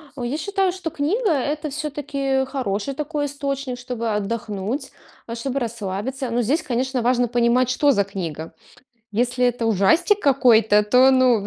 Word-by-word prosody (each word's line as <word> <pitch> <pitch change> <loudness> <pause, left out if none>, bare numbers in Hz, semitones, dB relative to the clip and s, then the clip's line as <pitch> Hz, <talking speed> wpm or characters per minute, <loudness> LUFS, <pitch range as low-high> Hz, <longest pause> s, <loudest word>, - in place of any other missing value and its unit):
О, 250 - -6
я 260 +5 -2
считаю, 390 +2 0
что 355 -3 -5
книга- 335 +8 0
это 300 +2 -2
всё-таки 280 -2 -2
хороший 260 -2 -3
такой 300 +1 -3
источник, 275 -2 -4
чтобы 235 -3 -3
отдохнуть, 210 +4 -3 0.4
а 230 - -5
чтобы 270 +3 -3
расслабиться. 235 +3 -4
Но 240 +1 0
здесь, 280 +9 +1
конечно, 255 0 -1
важно 245 0 +2
понимать, 240 +1 +2
что 285 +3 +3
за 200 -5 +2
книга. 170 -5 -6 0.6
Если 245 +3 0
это 240 -1 -1
ужастик 315 - +3
какой-то, 230 -6 +4
то, 250 +5 +5
ну, 250 -6 +3
255 Hz, 150 wpm, -22 LUFS, 230-285 Hz, 0.6 s, то